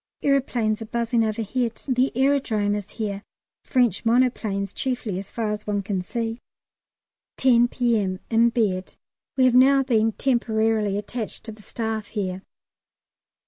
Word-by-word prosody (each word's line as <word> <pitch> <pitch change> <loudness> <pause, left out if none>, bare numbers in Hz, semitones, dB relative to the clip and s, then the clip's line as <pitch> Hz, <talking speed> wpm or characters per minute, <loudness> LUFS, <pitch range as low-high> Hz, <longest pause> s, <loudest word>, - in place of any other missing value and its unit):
Aeroplanes 245 -6 +1
are - - -4
buzzing 235 +1 0
overhead. 225 +2 -2
The 255 0 +2
Aerodrome 260 -7 +2
is 205 -1 -4
here, 205 -3 -3 0.4
French 245 -7 +1
monoplanes 225 -5 +1
chiefly 245 -7 -2
as 195 - -8
far 225 -2 -2
as 210 0 -5
one 205 -1 -1
can 190 -1 -2
see. 225 +4 -4 1.0
10 240 -2 +5
P.M., 220 -7 0
in 230 +1 +5
bed. 205 -6 -1 0.4
We 260 - +5
have 255 - +4
now 270 +2 +6
been 225 -3 +2
temporarily 220 -5 +1
attached 215 +2 -5
to 220 - -7
the 215 0 -13
Staff 220 -1 -4
here. 190 -3 -3
225 Hz, 140 wpm, -24 LUFS, 210-245 Hz, 1.0 s, now